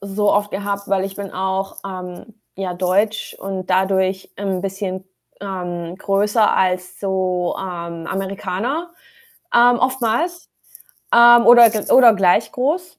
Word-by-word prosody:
so 200 +1 -1
oft 205 0 0
gehabt, 200 0 -3
weil 190 -1 0
ich 195 0 -7
bin 200 -1 -7
auch, 190 +1 -3
ähm, 185 +3 -9 0.2
ja, 190 -2 -4
deutsch 190 +4 -1
und 190 -1 -5
dadurch 190 0 0
'n 195 -2 -2
bisschen, 190 -1 -5 0.4
ähm, 175 -3 -6
größer 205 +3 +1
als 185 0 -1
so, 185 -2 -1
ähm, 170 -3 -6
Amerikaner, 200 - -4 0.6
ähm, 240 0 +5
oftmals, 260 +7 -1 0.6
ähm, 235 0 +7
oder 240 -1 +8
gl 215 -2 -2
oder 240 -4 +7
gleich 195 +3 +2
groß, 320 +7 -3
195 Hz, 130 wpm, -19 LUFS, 185-220 Hz, 0.6 s, oder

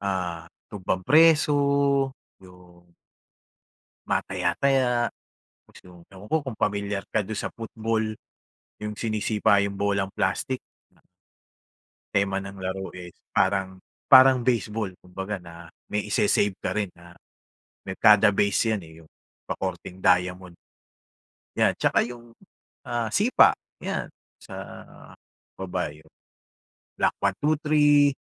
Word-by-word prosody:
ah, 90 -4 -3 0.2
tumbang-preso, 145 - +4 0.9
yung 90 -2 -18 1.1
Mga - - +2
taya-taya, 125 +9 +1 0.7
tapos - - -18
yung, 90 -1 -15
ewan 95 +1 -12
ko - - +3
kung 130 -6 -7
pamilyar 100 -1 -1
ka - - +2
do'n 105 +2 -5
sa - - -3
football, 110 -1 -2 0.7
yung 105 0 -5
sinisipa 110 -2 +1
yung 100 -1 -3
bolang 100 -1 0
plastic 105 +7 -1 0.3
na - - -31 1.1
tema 100 0 0
ng 100 0 -9
laro, 95 0 -4
eh, 90 -1 -10 0.2
parang 95 -1 0 0.3
parang 130 -1 +8
baseball 110 -4 0
kumbaga 95 +3 -5
na 85 -1 -12 0.2
may 105 0 -2
ise-save 100 -1 +2
ka - - -1
rin 105 -3 -1
na 85 0 -16 0.7
may 95 -1 -6
kada 105 0 +6
base 100 +3 +1
'yan, 105 - -1
eh, 80 - -14
yung - - -23 0.4
pakorteng 90 +1 -5
diamond. 90 -1 +1 1.0
'Yan. - - +3
Tsaka - - +3
yung, 120 -1 -11 0.5
ah, 120 -2 -2
sipa, 210 - +4 0.2
'yan, - - -3 0.3
sa - - -13 1.0
o 95 - -6
ba 90 0 -1
yun, 75 +1 -18 0.9
block - - +2
1, 100 -1 0
2, 150 +2 +3
3, 145 -2 +4
100 Hz, 120 wpm, -25 LUFS, 95-115 Hz, 1.1 s, parang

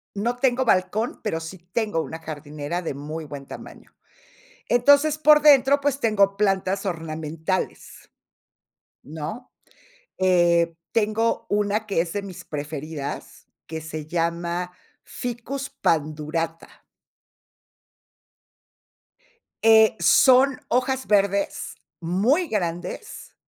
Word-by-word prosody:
No 235 +5 -1
tengo 255 0 +1
balcón, 215 +2 0
pero 165 -6 -1
sí 165 +3 -8
tengo 180 +1 -2
una 160 0 -6
jardinera 155 +2 -5
de 155 - -4
muy 155 +3 -6
buen 145 -2 -9
tamaño. - - -11 0.8
Entonces, 285 +5 +4
por 300 -1 +6
dentro, 280 -1 +6
pues, 280 -1 0
tengo 200 -4 +2
plantas 195 -1 0
ornamentales, 160 0 -4 0.9
¿no?, 160 - -7 0.7
eh, 170 -2 +3 0.2
tengo 225 +1 0
una 210 +1 0
que 195 -5 0
es 170 -1 -2
de 205 - -3
mis 190 -3 -9
preferidas, 150 0 -6 0.2
que 160 0 -5
se 155 -1 -7
llama 170 +1 -2 0.3
Ficus 250 +3 -5
Pandurata. 155 +1 -2 2.8
Eh, 220 -1 +6
son 255 - +5
hojas 260 +2 0
verdes, 200 -1 +1 0.3
muy 225 - +1
grandes, 175 - -4
190 Hz, 100 wpm, -24 LUFS, 160-235 Hz, 2.8 s, por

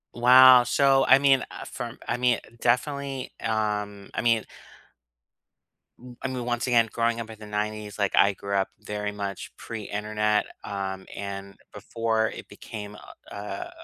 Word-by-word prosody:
Wow, 125 +1 +8
so, 135 +2 +3
I 135 - +7
mean 135 -2 +4
uh, - - -8
from - - -7
I - - -1
mean 125 -2 +2 0.2
definitely, 135 +2 -1
um, 105 -2 -2
I - - -2
mean 115 -1 +2 1.6
M 125 0 -13
I - - -2
mean, 130 -2 -4
once 120 +1 -1
again, 115 -2 +3
growing 115 0 0
up 115 -1 -6
in 110 -1 -11
the 110 - -10
90s, 105 0 -4
like, 100 -2 +1
I 100 +1 +5
grew 100 +1 -4
up 95 -1 +1
very 105 -1 -4
much 100 -2 -6
pre-Internet, 105 -1 -1 0.2
um, 95 -1 -5
and 100 -1 -6 0.2
before 110 +1 -1
it - - -9
became 105 -2 -9 0.4
uh - - -8
uh, 100 -1 -6
110 Hz, 155 wpm, -26 LUFS, 105-120 Hz, 1.6 s, Wow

